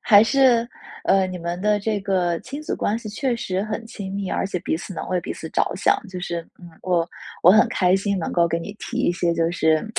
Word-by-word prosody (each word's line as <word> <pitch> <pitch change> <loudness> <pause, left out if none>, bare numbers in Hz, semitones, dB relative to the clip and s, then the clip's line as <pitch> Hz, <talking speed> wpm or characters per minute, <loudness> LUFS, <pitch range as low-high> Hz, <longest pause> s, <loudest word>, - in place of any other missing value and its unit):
还 210 0 +7
是， 250 -2 +4 0.4
呃， 195 -1 +4
你 185 -1 -5
们 170 +1 -4
的 210 0 +2
这 210 0 -1
个 185 -3 0
亲 280 +3 -7
子 - - -2
关 220 +3 -1
系 230 - -10
确 240 +3 -1
实 190 -3 -2
很 220 +1 -4
亲 195 -4 -7
密， 200 -1 -3
而 - - 0
且 190 -2 -3
彼 - - -1
此 190 +2 -8
能 - - -5
为 180 -1 0
彼 - - -7
此 - - -7
着 - - +2
想， - - +3
就 185 -1 -6
是 170 -1 -3 0.2
嗯， 175 -1 -12
我 175 -2 +1 0.4
我 175 - +8
很 215 +3 +6
开 180 -1 +2
心 200 0 0
能 165 - -3
够 170 -1 +3
给 165 - 0
你 200 +5 -7
提 235 - -6
一 175 - +2
些 170 -1 0
就 165 0 +1
是， 160 0 +2
190 Hz, 265 characters per minute, -23 LUFS, 175-215 Hz, 0.4 s, 我